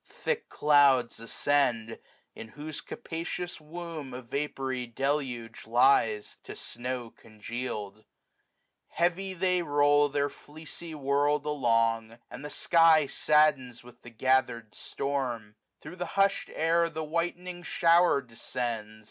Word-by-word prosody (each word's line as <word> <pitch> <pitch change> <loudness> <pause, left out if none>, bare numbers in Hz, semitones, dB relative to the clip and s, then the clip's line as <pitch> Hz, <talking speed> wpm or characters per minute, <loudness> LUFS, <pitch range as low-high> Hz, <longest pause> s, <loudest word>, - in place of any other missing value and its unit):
Thick 480 -2 -4
clouds 140 -5 +4
ascend; 115 -2 0 0.3
in 115 - -9
whose 150 +5 -7
capacious 170 +1 -6
womb 160 -2 -7
225 125 +1 -7
A - - -25
vapoury 135 -3 -2
deluge 125 -3 -3
lies, 115 -3 +3
to - - -9
snow 120 -1 -5
congeal'd 110 -1 -7 0.8
Heavy 185 +3 -1
they 180 0 +1
roll 145 -1 +3
their 145 0 0
fleecy 160 +3 -10
world 145 +1 +1
along 115 -6 +1
j 115 - -16
And - - -8
the 150 - -5
sky 165 0 +4
saddens 140 -5 +2
with 125 0 -16
the 120 - -11
gathered 115 -2 0
storms 125 -6 -3 0.3
Thro* 150 - -9
the 180 0 -5
hush'd 195 0 +2
air 165 +1 +2
the 160 -1 -5
whitening 175 +3 -3
shower 170 -4 +3
descends. 115 -2 -5
140 Hz, 120 wpm, -29 LUFS, 120-160 Hz, 0.8 s, clouds